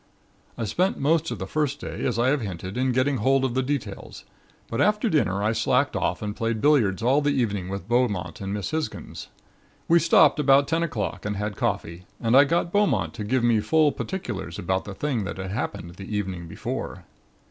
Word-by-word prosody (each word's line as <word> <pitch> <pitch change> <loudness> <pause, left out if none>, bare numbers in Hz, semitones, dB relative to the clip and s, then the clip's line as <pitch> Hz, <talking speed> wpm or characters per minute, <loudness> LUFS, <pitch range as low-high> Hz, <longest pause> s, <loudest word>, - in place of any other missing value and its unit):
"I 115 - -3
spent 180 - 0
most 160 +3 +1
of 120 - -4
the 95 - -4
first 145 +5 -1
day, - - -6
as 125 - -1
I 120 +2 +3
have 145 -1 +1
hinted, 95 -2 -5
in 130 +1 +1
getting 130 +2 +1
hold 135 +4 +2
of 125 - -1
details; 125 -9 -4 0.4
but 115 - -2
after 210 +2 +2
dinner 100 - +1
I 105 - +2
slacked 125 +5 +1
off - - -1
and 105 0 -3
played 115 -2 -1
billiards 115 -8 +3
all 135 +5 +3
the 145 - +1
evening 100 -6 -1
with 100 -1 -5
Beaumont 105 -9 0
and 100 0 -4
Miss 105 +4 -3
Hisgins. 160 0 -4 0.6
We 170 +1 +5
stopped 160 -2 +5
about 140 -1 +5
ten 165 0 0
o'clock 115 - -3
and 105 0 -2
had 105 0 -3
coffee 85 0 -3
and 115 +1 +2
I 140 +2 +8
got 170 +3 0
Beaumont 120 - +1
to 105 - -5
give 120 +4 0
me 120 -2 +4
full 155 +6 +3
particulars 180 - -5
about 95 +2 -1
the 100 - -7
thing 130 -3 -1
that 100 - -5
had 95 0 -5
happened 100 -6 -4
the 95 +3 -5
evening 95 -4 -4
before. 80 - -5
120 Hz, 200 wpm, -25 LUFS, 100-145 Hz, 0.6 s, I